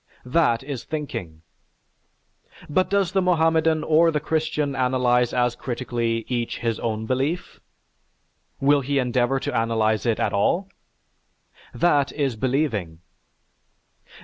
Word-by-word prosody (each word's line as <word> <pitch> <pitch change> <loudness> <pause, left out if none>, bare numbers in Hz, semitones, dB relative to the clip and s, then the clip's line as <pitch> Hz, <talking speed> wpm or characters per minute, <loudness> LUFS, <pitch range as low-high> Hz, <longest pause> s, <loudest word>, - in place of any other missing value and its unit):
That 125 -3 +2
is 135 -3 -5
thinking. 115 - -6 1.2
But 185 +5 +1
does 195 -3 +1
the 190 - +2
Mohammedan 160 -3 +2
or 160 +2 +4
the 155 -2 0
Christian 150 -2 -1
analyze 125 -2 +2
as 125 -1 +1
critically 120 -2 -2
each 120 -2 -2
his 115 -2 -2
own 110 -1 -2
belief? 135 +9 -2 1.0
Will 140 +1 +3
he 140 +2 -1
endeavor 125 +1 +1
to - - -4
analyze 110 0 +1
it 115 - +1
at - - 0
all? 175 - +1 1.0
That 145 -5 +2
is 140 -5 -1
believing. 110 - -1
130 Hz, 120 wpm, -23 LUFS, 115-155 Hz, 1.2 s, or